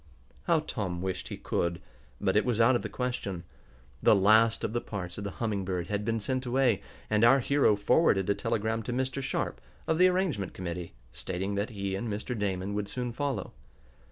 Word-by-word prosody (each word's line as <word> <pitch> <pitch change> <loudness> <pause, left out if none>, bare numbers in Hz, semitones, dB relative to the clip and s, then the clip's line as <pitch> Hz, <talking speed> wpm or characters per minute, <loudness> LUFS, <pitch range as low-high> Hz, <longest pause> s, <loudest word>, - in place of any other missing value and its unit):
How 165 -2 +3
Tom 95 - -3
wished 95 -1 -3
he - - -6
could, 85 0 -1 0.4
but - - +1
it - - +5
was 120 -3 0
out 120 +3 +5
of - - +1
the - - -5
question. 110 -8 -3 0.6
The - - +6
last 110 +3 +5
of - - -2
the 120 - 0
parts 90 -3 -5
of - - -5
the 100 - -3
Humming 105 -4 -1
Bird 90 -2 -3
had 105 0 -1
been 115 +1 0
sent 130 +4 -2
away, 125 -5 +2 0.3
and 105 +1 +2
our 125 +4 +7
hero 140 -4 +3
forwarded 100 - +3
a 100 - +3
telegram 110 +2 -1
to 115 +3 -4
Mr. 130 +2 -1
Sharp, 135 - -2 0.2
of 160 +1 0
the 185 - +7
arrangement 180 - 0
committee, 85 -3 -5 0.2
stating 95 +2 -3
that 100 +2 -1
he 100 -3 -3
and 110 +4 -3
Mr. 105 +4 -3
Damon 100 -2 -2
would 105 -1 -2
soon 125 +1 -3
follow. 140 +3 -3
105 Hz, 200 wpm, -29 LUFS, 95-125 Hz, 0.6 s, our